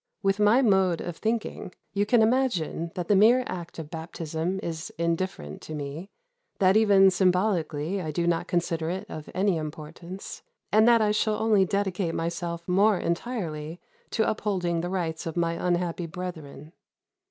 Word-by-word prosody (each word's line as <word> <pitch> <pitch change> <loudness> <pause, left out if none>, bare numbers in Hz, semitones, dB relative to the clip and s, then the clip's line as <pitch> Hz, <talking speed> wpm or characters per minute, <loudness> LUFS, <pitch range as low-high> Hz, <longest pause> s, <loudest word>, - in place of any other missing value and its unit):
With 195 +1 +1
my 215 +6 +5
mode 190 -6 +3
of 175 -2 -5
thinking, 220 -4 -3 0.2
you 205 +1 +1
can 230 0 +5
imagine 220 - 0
that 180 -3 -3
the 205 - +4
mere 235 +6 +6
act 175 -2 -6
of 155 -2 -7
baptism 165 +2 -4
is 160 -1 -5
indifferent 170 - -2
to 155 - -7
me; 150 +6 -6 0.5
that 190 -1 +4
even 200 -3 +6
symbolically 180 -2 +1
I 160 - -4
do 170 +3 -1
not 170 -1 0
consider 165 -2 -1
it 190 +4 -3
of 155 - -8
any 190 -1 +2
importance, 160 +4 -7 0.3
and 215 +2 +5
that 230 -2 +6
I 210 - +2
shall 215 0 +1
only 215 -3 +3
dedicate 190 -3 -1
myself 170 0 -3
more 200 +3 +4
entirely 170 -4 -3 0.3
to 220 - +1
upholding 180 -6 -1
the 175 - -3
rights 170 -4 -3
of 165 - -5
my 170 -1 +1
unhappy 175 0 -1
brethren. 160 -3 -8
180 Hz, 160 wpm, -26 LUFS, 165-200 Hz, 0.5 s, mere